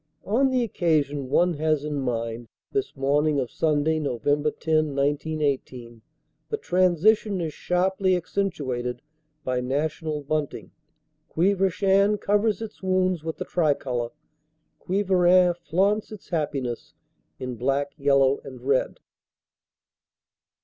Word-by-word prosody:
On 255 +7 +2
the 255 -1 +1
occasion 145 - 0
one 175 +5 +3
has 155 -2 +1
in 150 -2 -2
mind 115 -2 -3 0.2
this 410 -1 -2
morning 145 +2 +2
of 125 -3 -3
Sunday, 155 0 +1
Nov. 135 -6 -3
10, 145 - +3
1918 145 -5 -1 0.5
the 440 - -1
transition 185 - +2
is 160 -3 -3
sharply 185 +1 +1
accentuated 130 -10 -3 0.4
by 125 -1 -1
national 150 +3 -2
bunting; 150 0 -3 0.6
Quievrechain 195 +3 +2
covers 210 +1 +1
its 220 - -9
wounds 185 -3 +1
with 160 0 -4
the - - -4
tricolor, 135 -7 0 0.7
Quievrain 185 -2 +3
flaunts 190 +6 0
its 215 -3 -11
happiness 140 -7 -3 0.4
in 125 -1 -5
black, 135 +4 0
yellow 140 -2 +3
and 130 -3 -10
red. 135 -1 0
155 Hz, 110 wpm, -25 LUFS, 140-185 Hz, 0.7 s, one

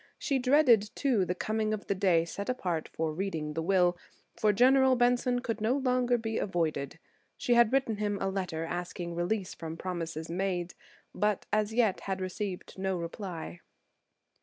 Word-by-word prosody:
She 275 -3 0
dreaded, 250 -5 +4
too, 245 -9 +2
the 180 - -2
coming 215 +2 -1
of 210 - -10
the - - 0
day 185 -4 +3
set 200 +5 -5
apart 180 -10 -2
for 160 -1 -2
reading 160 -4 -3
the 165 - -2
will, 180 0 +3 0.4
for 215 - +3
General 260 +4 +5
Benson 245 0 +2
could 230 -3 -3
no 235 +5 +2
longer 250 -2 +2
be 225 -1 -2
avoided. 160 -6 -1 0.4
She 245 - +1
had 235 -2 +5
written 265 -5 +1
him 205 -1 -1
a 195 - -1
letter 180 -4 -3
asking 175 0 -4
a - - -5
release 180 +3 -1
from 165 0 -7
promises 165 -3 -4
made, 180 0 -2 0.4
but 210 -1 0
as 215 0 +2
yet 220 -5 +2
had 190 -1 -3
received 185 0 -5
no 190 -1 -1
reply. 170 0 -6
195 Hz, 170 wpm, -30 LUFS, 175-235 Hz, 0.4 s, General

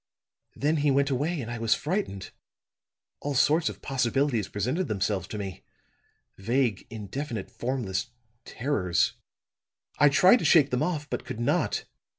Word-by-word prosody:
"Then 150 +3 +1
he 145 0 +2
went 140 +1 +2
away, 145 +5 -1
and 120 -1 -6
I 115 - -4
was 115 -1 +3
frightened. 150 - -3 0.9
All 145 -1 -3
sorts 155 +4 +3
of - - -10
possibilities 135 -3 0
presented 130 - -1
themselves 100 -2 -1
to 105 - -6
me 95 -3 -6 0.8
vague, 115 0 0
indefinite, 115 +2 -5
formless 120 -6 -2 0.4
terrors. 105 -12 0 0.9
I 145 - +7
tried 185 - +6
to - - -4
shake 150 -5 +5
them 125 - 0
off, 155 -5 -1
but - - -4
could 125 -3 -6
not. 120 - 0
130 Hz, 145 wpm, -27 LUFS, 110-145 Hz, 0.9 s, I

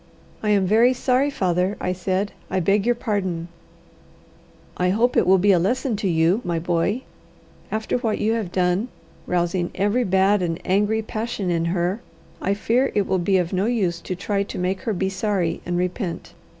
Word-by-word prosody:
"I 215 - -1
am 200 -2 +3
very 225 +6 +4
sorry, 260 +3 +2
father," 185 -5 0
I 180 - -1
said; 190 +2 -1 0.2
"I 190 - 0
beg 200 +4 +2
your 240 - +3
pardon." 190 -7 -2 1.3
"I 180 0 +1
hope 230 +6 +2
it - - +3
will 190 +1 +6
be 200 +2 +4
a 180 - +4
lesson 245 +6 0
to 200 - -1
you, 170 +6 +2
my 170 -1 -1
boy. 175 +8 0 0.7
After 220 +3 -1
what 225 -3 -1
you 220 +2 +1
have 220 -6 -2
done, 180 +5 +1 0.4
rousing 175 0 0
every 205 +6 +1
bad 195 0 +3
and 165 -2 -2
angry 210 +4 +1
passion 215 -4 -3
in 165 -1 0
her, 180 +5 -1 0.4
I 195 +2 0
fear 245 +6 +1
it 205 -2 +2
will 190 0 0
be 190 +2 +2
of 180 0 -1
no 190 +3 +1
use 190 -8 0
to 185 - -4
try 200 +2 -1
to 200 - -5
make 185 +1 -1
her - - +1
be 190 0 -1
sorry 190 -3 -1
and 175 0 -1
repent. 180 0 -3
195 Hz, 190 wpm, -23 LUFS, 180-215 Hz, 1.3 s, will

